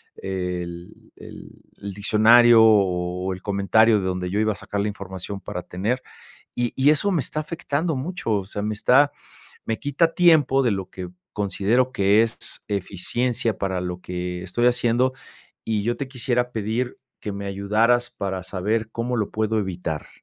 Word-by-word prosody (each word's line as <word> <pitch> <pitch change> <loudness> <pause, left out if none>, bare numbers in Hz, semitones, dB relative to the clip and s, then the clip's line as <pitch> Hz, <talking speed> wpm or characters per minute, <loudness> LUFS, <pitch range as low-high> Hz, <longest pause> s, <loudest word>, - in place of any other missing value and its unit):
el 90 -2 -6
el - - -11 0.3
el 100 -1 -7
diccionario 115 +3 +6
o 90 -3 +2
el 95 - -9
comentario 105 +2 +3
de 95 - -3
donde 90 -1 -2
yo 105 - 0
iba 110 0 +2
a - - -12
sacar 100 0 -4
la 105 - 0
información 100 -1 -7
para 90 -1 -6
tener 110 +8 -2 0.5
y 120 -1 -1
y 135 +2 +4
eso 155 +7 +1
me 170 -7 +1
está 155 - -3
afectando 160 0 -2
mucho, 135 -3 -3
o 100 -2 0
sea, 105 +1 -5
me 105 +1 -1
está 135 +7 +4 0.5
me 110 - -2
quita 155 +4 +1
tiempo 155 -6 +5
de 120 - +2
lo 95 -2 -4
que 90 -1 -7 0.2
considero 105 +5 +1
que 100 -1 +4
es 115 -1 -2 0.3
eficiencia 105 +4 -1
para 95 -2 -1
lo 90 0 -4
que 90 0 -5
estoy 95 +7 0
haciendo 125 +1 +2 0.5
y 110 -2 -1
yo 120 +1 0
te 140 - -5
quisiera 125 -1 -1
pedir 115 +3 -2 0.2
que 105 - -5
me 100 0 -6
ayudaras 110 +5 +1
para 95 -1 -4
saber 105 +4 -2
cómo 120 +2 -2
lo 105 -3 -1
puedo 110 0 0
evitar. 90 -6 -4
105 Hz, 170 wpm, -23 LUFS, 95-120 Hz, 0.5 s, diccionario